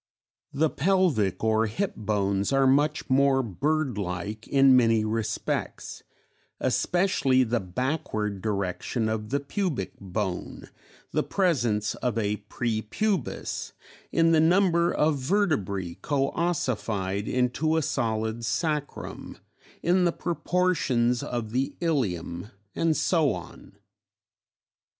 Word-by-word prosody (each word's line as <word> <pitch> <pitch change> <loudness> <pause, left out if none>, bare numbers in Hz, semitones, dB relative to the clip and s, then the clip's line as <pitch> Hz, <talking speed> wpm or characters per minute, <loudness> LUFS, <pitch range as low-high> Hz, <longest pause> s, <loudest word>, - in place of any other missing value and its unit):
The 155 +2 +1
pelvic 165 - +1
or 110 0 +2
hip 190 - -2
bones 100 -1 0
are 135 0 +3
much 145 +3 +2
more 135 0 +3
bird 135 - -1
like 100 +4 -4
in 135 -1 +5
many 115 -3 +4
respects, 110 0 -3 0.6
especially 140 -8 +2
the 120 0 0
backward 105 - -2
direction 105 +3 -2
of 110 -1 -3
the 140 - +1
pubic 145 - -2
bone, 95 -1 -4 0.4
the - - +1
presence 120 - +1
of 120 -3 -2
a 105 -1 0
prepubis, 120 - -2 0.4
in 165 0 +3
the 160 - +5
number 170 +1 +4
of 150 -2 +1
vertebrae 130 - 0
coössified 115 - -1
into 130 +6 +1
a 160 - +1
solid 110 -3 -1
sacrum, 150 +5 -3 0.5
in 180 +1 +3
the 175 - +3
proportions 165 -9 0
of 120 -3 -4
the 130 +3 -1
ilium 100 - -1 0.2
and 165 -2 +1
so 160 -6 +2
on. - - -11
125 Hz, 110 wpm, -26 LUFS, 105-155 Hz, 0.6 s, in